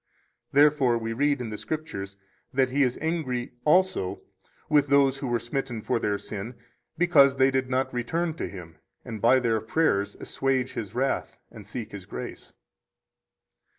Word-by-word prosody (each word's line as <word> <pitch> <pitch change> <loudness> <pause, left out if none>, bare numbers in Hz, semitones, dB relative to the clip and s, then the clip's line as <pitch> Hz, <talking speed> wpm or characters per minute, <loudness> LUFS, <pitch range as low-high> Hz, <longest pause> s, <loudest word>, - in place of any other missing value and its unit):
Therefore 140 -4 +4
we 115 0 -3
read 145 +2 +1
in 115 -3 -5
the 105 - -5
Scriptures 110 -8 -5 0.3
that 130 -1 +2
He 140 +2 +1
is 125 -2 +2
angry 145 -7 -2
also 180 - +2 0.4
with 145 -1 +3
those 140 -1 +4
who 135 - -3
were 120 -1 +1
smitten 120 -1 -4
for 125 -2 0
their 105 -2 0
sin, 105 +4 -7 0.4
because 150 -6 +5
they 135 0 +4
did 130 -1 0
not 130 +1 0
return 160 +8 -1
to - - -3
Him 85 -5 -10 0.3
and 110 -3 -6
by 130 +3 +5
their 115 -3 +1
prayers 110 -6 +1
assuage 130 -1 -1
His 105 -4 -6
wrath 135 +2 -1
and 105 -4 -12
seek 110 +1 -6
His 95 -3 -9
grace. - - -7
130 Hz, 160 wpm, -26 LUFS, 115-140 Hz, 0.4 s, because